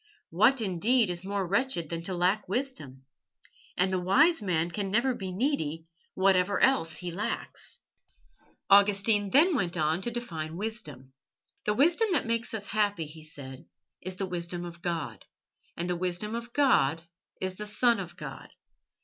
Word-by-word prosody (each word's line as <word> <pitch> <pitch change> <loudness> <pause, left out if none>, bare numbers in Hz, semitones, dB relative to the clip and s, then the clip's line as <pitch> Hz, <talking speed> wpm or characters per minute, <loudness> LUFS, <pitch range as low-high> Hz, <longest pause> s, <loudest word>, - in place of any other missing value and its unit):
What, 230 +9 +4
indeed, 210 +3 +2
is 175 +1 -5
more 200 0 -2
wretched 200 - 0
than 165 -1 -3
to 185 - -2
lack 180 +3 +1
wisdom? 170 - -4 0.7
And 185 +1 +2
the 185 - +1
wise 275 - +4
man 175 -4 0
can 200 +1 -3
never 240 +6 +2
be 190 -5 -5
needy, 170 - -1 0.3
whatever 190 +1 +3
else 165 -12 +2
he 180 -1 -5
lacks." 200 +5 -4 0.9
Augustine 200 +1 +4
then 315 - +5
went 180 -7 -1
on 160 +2 +1
to 240 - -2
define 165 -10 -5
wisdom. 150 - -4 0.5
"The 210 - +1
wisdom 345 - +3
that 300 - +1
makes 230 0 -1
us 210 -2 -4
happy," 205 -6 0
he 155 +1 -10
said, 135 -4 -7 0.4
"is 185 0 -5
the 195 - -2
wisdom 175 -1 -4
of 170 0 -9
God, 160 - -3 0.5
and 175 - -2
the 180 - 0
wisdom 185 +4 -2
of 235 +1 -5
God 165 - +3 0.4
is 185 0 -3
the 210 - -5
Son 230 +1 +3
of 175 -2 -7
God. - - -8
190 Hz, 160 wpm, -29 LUFS, 170-225 Hz, 0.9 s, then